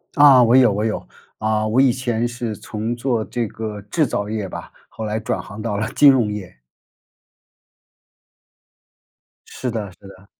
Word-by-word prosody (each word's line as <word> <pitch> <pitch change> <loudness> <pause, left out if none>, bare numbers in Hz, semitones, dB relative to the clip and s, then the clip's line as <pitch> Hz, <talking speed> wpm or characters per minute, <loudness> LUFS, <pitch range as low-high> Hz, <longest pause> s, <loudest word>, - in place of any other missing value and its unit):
啊， 140 -4 +8
我 120 +2 +4
有 125 -5 +6
我 105 +2 -1
有。 110 - -2 0.3
啊， 110 0 0
我 115 +5 +3
以 135 - +5
前 120 -2 -1
是 120 -3 -4
从 110 +4 -4
做 120 -3 -1
这 120 -1 -2
个 105 0 -6
制 150 +8 0
造 105 -2 -3
业 105 -2 -3
吧， - - -8 0.2
后 110 - -8
来 110 +1 -2
转 110 - -3
行 100 +2 -10
到 110 -2 -2
了 110 +1 -2
金 145 - +7
融 120 -6 +3
业。 100 -9 -7 2.9
是 125 - -5
的， 105 -4 -4
是 - - -26
的。 95 0 -15
110 Hz, 180 characters per minute, -20 LUFS, 105-125 Hz, 2.9 s, 啊